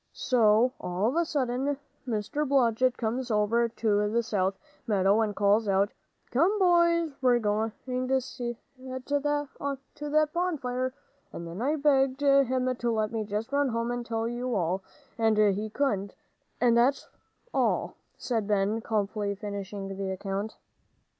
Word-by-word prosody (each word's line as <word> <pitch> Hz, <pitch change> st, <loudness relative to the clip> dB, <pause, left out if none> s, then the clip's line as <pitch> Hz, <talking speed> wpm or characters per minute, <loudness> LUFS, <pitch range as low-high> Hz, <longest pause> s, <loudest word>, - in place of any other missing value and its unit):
So 235 Hz, -1 st, +3 dB
all 180 Hz, +3 st, -1 dB
of 265 Hz, -, -3 dB
a 340 Hz, -, +3 dB
sudden 270 Hz, -1 st, -1 dB, 0.3 s
Mr. 230 Hz, +6 st, -1 dB
Blodgett 255 Hz, -2 st, +3 dB
comes 245 Hz, +2 st, -2 dB
over 225 Hz, +2 st, +2 dB
to 210 Hz, -2 st, +1 dB
the 235 Hz, +2 st, +1 dB
south 195 Hz, -3 st, 0 dB, 0.3 s
meadow 200 Hz, 0 st, +3 dB
and 210 Hz, -2 st, -1 dB
calls 205 Hz, +2 st, +3 dB
out, 195 Hz, +1 st, +2 dB, 0.4 s
'Come, 340 Hz, -, +3 dB
boys, 340 Hz, -3 st, +3 dB
we're 250 Hz, -2 st, +4 dB
going 220 Hz, 0 st, 0 dB
to 255 Hz, +1 st, 0 dB
set 245 Hz, -2 st, -5 dB, 0.5 s
to 290 Hz, 0 st, 0 dB
on 280 Hz, -1 st, -2 dB, 0.2 s
that 300 Hz, +1 st, +1 dB
bonfire!' 260 Hz, -8 st, -1 dB, 0.4 s
And 170 Hz, -, -7 dB
then 170 Hz, +5 st, -6 dB
I 290 Hz, +5 st, +1 dB
begged 275 Hz, -2 st, +2 dB
him 260 Hz, -2 st, +3 dB
to 240 Hz, -1 st, -1 dB
let 215 Hz, -1 st, 0 dB
me 225 Hz, -1 st, -2 dB
just 210 Hz, +4 st, -3 dB
run 285 Hz, -1 st, +2 dB
home 230 Hz, 0 st, -1 dB
and 245 Hz, 0 st, -3 dB
tell 225 Hz, -1 st, -2 dB
you 240 Hz, +1 st, -2 dB
all, 185 Hz, +1 st, 0 dB, 0.4 s
and 220 Hz, -1 st, +3 dB
he 210 Hz, 0 st, +2 dB
couldn't, 205 Hz, -6 st, -1 dB, 0.4 s
and 240 Hz, -1 st, +4 dB
that's 250 Hz, +4 st, +2 dB, 0.5 s
all," -, -, +1 dB, 0.2 s
said 225 Hz, -5 st, -2 dB
Ben, 210 Hz, +2 st, +1 dB
calmly 205 Hz, -2 st, -1 dB
finishing 200 Hz, -1 st, -5 dB
the 195 Hz, 0 st, -4 dB
account. 195 Hz, +2 st, -4 dB
235 Hz, 150 wpm, -28 LUFS, 210-265 Hz, 0.5 s, we're